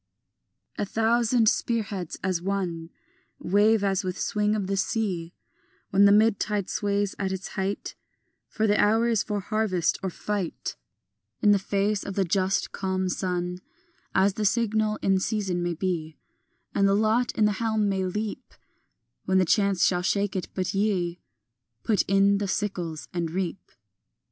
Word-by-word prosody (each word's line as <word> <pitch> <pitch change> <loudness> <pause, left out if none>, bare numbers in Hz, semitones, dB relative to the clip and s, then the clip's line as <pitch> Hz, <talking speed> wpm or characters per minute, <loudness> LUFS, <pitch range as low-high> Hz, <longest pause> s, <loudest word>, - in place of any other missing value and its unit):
A - - +1
thousand 230 +2 +2
spear 230 +1 +1
heads 195 -5 -6
as 185 -3 0
one 175 -4 -3 0.5
Wave 205 +3 +3
as 195 0 +1
with 185 0 -3
swing 210 0 0
of 205 -3 -1
the 195 +1 -1
sea 190 -4 -2 0.6
When 195 +1 +5
the 200 - +7
mid 215 0 +4
tide 210 -3 -2
sways 200 -1 0
at 190 -1 -1
its 190 0 -4
height; 195 +1 -3 0.5
For 220 - -1
the 210 -1 +3
hour 225 +3 +3
is 225 -3 +2
for 205 -2 -3
harvest 195 -4 0
or 190 - -2
fight 195 -1 -4 0.6
In 205 -1 +5
face 200 +1 0
of 195 - -6
the 195 - +2
just 190 +2 0
calm 190 -1 -2
sun, 180 -1 -2 0.6
As 195 +1 +4
the 215 - -3
signal 215 0 +1
in 195 -1 +3
season 195 -3 -1
may 175 -1 -1
be 160 -3 -3 0.6
And 195 - +3
the 195 - +3
lot 220 +3 +2
in 215 - +2
the 210 - +3
helm 220 -2 +1
may 195 -1 0
leap 210 +3 -4 0.7
When 190 0 +3
chance 200 0 +3
shall 180 -1 +2
shake 200 +1 0
it; 185 - -2
but 185 +1 -1
ye, 185 -4 0 0.6
Put 215 -3 +2
in 195 +1 +4
the 205 - -2
sickles 180 -6 -3
and 170 -2 -1
reap. 180 +1 -4
195 Hz, 160 wpm, -26 LUFS, 185-210 Hz, 0.7 s, the